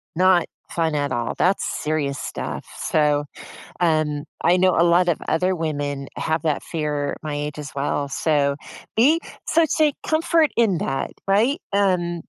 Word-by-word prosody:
not 180 0 +4 0.3
fun 160 -2 0
at 145 -1 -1
all. 120 -1 -2
That's 190 +2 +2
serious 150 -3 -2
stuff. - - -5
So, 150 -1 +1 0.6
um, 155 -3 +1 0.2
I 175 +2 +4
know 185 0 +3
a 170 - +5
lot 175 +1 +4
of 170 - +2
other 180 +3 +1
women 145 -3 -3
have 160 +1 -1
that 155 -3 0
fear 150 -3 -2
at - - -8
my 150 -1 -4
age 150 0 -4
as 150 0 -7
well. 140 0 -1
So, 140 -1 +1 0.4
be 295 +9 +4 0.3
so 330 0 +3
take 300 -2 +3
comfort 320 0 +3
in 210 -8 +3
that. 135 0 -2 0.2
Right? 220 +9 +2
Um, 180 -4 +1
160 Hz, 160 wpm, -22 LUFS, 145-185 Hz, 0.6 s, a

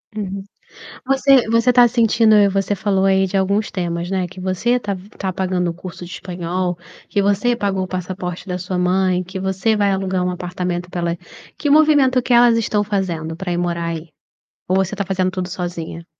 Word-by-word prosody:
Uhum, 195 -2 -4 0.6
você 270 -2 +4
você 230 +2 +4
está 245 -1 +6
sentindo, 225 -2 +4
você 195 +1 0
falou 195 0 +1
aí 190 0 +3
de 190 - -3
alguns 200 +2 0
temas, 170 -1 -3
né, 185 -2 -1
que 185 +1 -11
você 185 +5 -1
está 240 -5 +1
está 190 0 -6
pagando 185 -1 -1
o 165 - -7
curso 180 0 -9
de 175 - -10
espanhol, 180 -1 -3 0.3
que 205 - 0
você 205 +4 +2
pagou 195 -3 -1
o 185 - -4
passaporte 180 0 -5
da 180 -1 -3
sua 185 0 -3
mãe, 185 0 +1
que 190 +1 -7
você 190 +4 0
vai 205 -1 +2
alugar 190 -1 -1
um 180 - 0
apartamento 180 0 -4
pela 170 -1 -2 0.4
que 295 - -2
movimento 285 -4 +5
que 250 - -1
elas 240 -1 +6
estão 210 -2 0
fazendo 175 -6 -2
para 180 +1 -4
ir 175 - -1
morar 170 -1 -1
aí? 165 0 -4 0.6
Ou 185 - +2
você 190 +1 0
está 200 -1 -2
fazendo 185 -1 0
tudo 185 -1 -4
sozinha? 170 -2 -5
190 Hz, 195 wpm, -19 LUFS, 180-205 Hz, 0.6 s, está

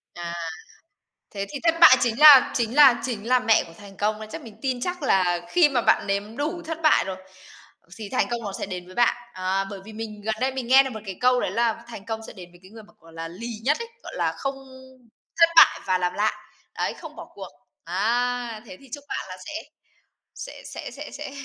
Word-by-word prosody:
À. 170 0 -6 1.0
Thế 200 -1 -4
thì 285 -2 -6
thất 330 0 +2
bại 295 -6 +9
chính 235 +2 0
là 295 -4 +9
chính 235 +1 -1
là 275 -5 +7
chính 230 -3 -5
là 255 0 +4
mẹ 230 -3 +3
của 165 - -14
thành 200 -2 -14
công 215 +1 -1
đấy. 215 - -8
Chắc - - -7
mình 220 -2 -12
tin 255 -3 -2
chắc 360 -1 -4
là 180 -7 +2
khi 340 -4 +4
mà 250 -4 +1
bạn - - +2
nếm 205 +4 -3
đủ 320 +4 -3
thất 325 0 -4
bại 310 - +5
rồi, 190 -1 -5 0.8
thì 210 -3 -7
thành 255 - 0
công 235 -1 -2
nó 200 - -4
sẽ - - -3
đến 180 -2 -7
với 185 - -14
bạn. 240 -1 +3 0.2
À, 190 +1 -1
bởi 200 - -7
vì 220 - -11
mình 215 -1 -7
gần 220 +1 -2
đây 265 +1 +1
mình 255 -3 -5
nghe 265 +2 +7
được 265 - -4
một 220 - -6
cái 190 -2 -7
câu 250 0 +4
đấy - - -2
là 230 0 0
thành 205 -4 -10
công 225 -1 -4
sẽ - - -10
đến 180 -3 -12
với 175 - -19
cái 190 - -16
người 220 -1 -12
mà, - - -21
gọi 165 0 -18
là, 165 0 -6
lì 195 +8 -8 0.2
nhất 295 +4 +2
ấy, 465 0 -6
gọi - - -9
là, - - 0
không 275 0 -3 0.8
thất 335 0 +7
bại - - +7
và 185 0 +2
làm 180 0 -1
lại. 215 +1 +1 0.4
Đấy, - - -1
không - - -11
bỏ - - -9
cuộc, - - -8 0.3
á, 235 +5 -1
thế 185 - -11
thì 270 - -17
chúc 285 -1 -7
bạn - - -4
là 185 - -8
sẽ 305 - -8 0.8
sẽ - - -9
sẽ - - -7
sẽ - - -9
sẽ 275 - -7
225 Hz, 245 wpm, -24 LUFS, 195-265 Hz, 1.0 s, bại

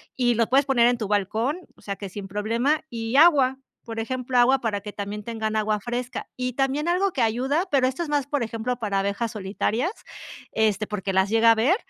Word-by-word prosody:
y 245 -2 +2
lo 230 0 +2
puedes 270 +3 +3
poner 240 -3 +4
en 245 0 +2
tu 220 -3 -3
balcón, 215 - 0 0.2
o - - -22
sea, 200 -1 -4
que 200 +1 -7
sin 195 +1 -7
problema, 230 +9 0
y 230 0 -4
agua, 280 -5 +5 0.3
por 225 -2 -6
ejemplo, 255 +2 -2
agua 260 +2 +5
para 220 -4 -1
que 210 0 -8
también 205 +1 -5
tengan 220 -1 -3
agua 215 -1 +1
fresca. 240 +3 -4
Y 250 -1 -2
también 275 +4 0
algo 370 +3 +2
que 270 - -2
ayuda, 260 +9 +1
pero 265 -3 +3
esto 265 +7 -2
es 315 - -6
más, 290 -2 +1
por 285 -3 -1
ejemplo, 230 +2 -3
para 205 -4 -1
abejas 200 +3 -1
solitarias, 215 - -1 0.6
este, 215 -1 +1
porque 200 -2 -3
las 190 +1 +2
llega 225 +1 +5
a - - +9
haber, 245 +11 +3
235 Hz, 215 wpm, -24 LUFS, 210-265 Hz, 0.6 s, a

